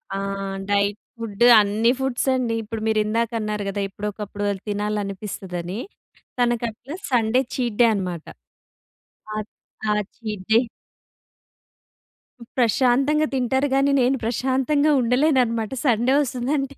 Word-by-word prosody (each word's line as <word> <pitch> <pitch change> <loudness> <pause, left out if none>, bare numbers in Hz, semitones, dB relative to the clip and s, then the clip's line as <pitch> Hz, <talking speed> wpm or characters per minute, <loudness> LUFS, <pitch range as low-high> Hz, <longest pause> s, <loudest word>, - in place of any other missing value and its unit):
ఆ! - - -1 0.5
Diet 200 0 +2 0.2
food 225 0 -2 0.2
అన్నీ 215 +3 +2
foods 265 0 -1
అండి. 240 -3 0
ఇప్పుడు 220 0 -6
మీరిందాక 220 +1 +1
అన్నారు 210 -1 -2
కదా! 200 +1 -3
ఎప్పుడో 205 +2 -5
ఒకప్పుడు 205 -1 -5 0.2
తినాలని 210 0 -1
అనిపిస్తదని, 190 -1 -5 0.6
తనకట్లా 240 +4 -1 0.2
సండే 240 +1 +3
చీట్ 240 -5 -2
డే 235 - +7
అనమాట. 180 -5 -3 1.1
ఆ! - - -4 0.6
ఆ! - - +2 0.2
Cheat 210 -5 -6
day. 230 - +6 2.0
ప్రశాంతంగా 260 +5 +3
తింటారు 265 +2 +1
గాని 275 +1 +3
నేను 260 +2 +2
ప్రశాంతంగా 265 +5 +1
ఉండలేనన్నమాట. 250 -3 +2
సండే 240 +2 +3
వస్తుందంటే 275 +2 -2
230 Hz, 110 wpm, -23 LUFS, 210-255 Hz, 2.0 s, డే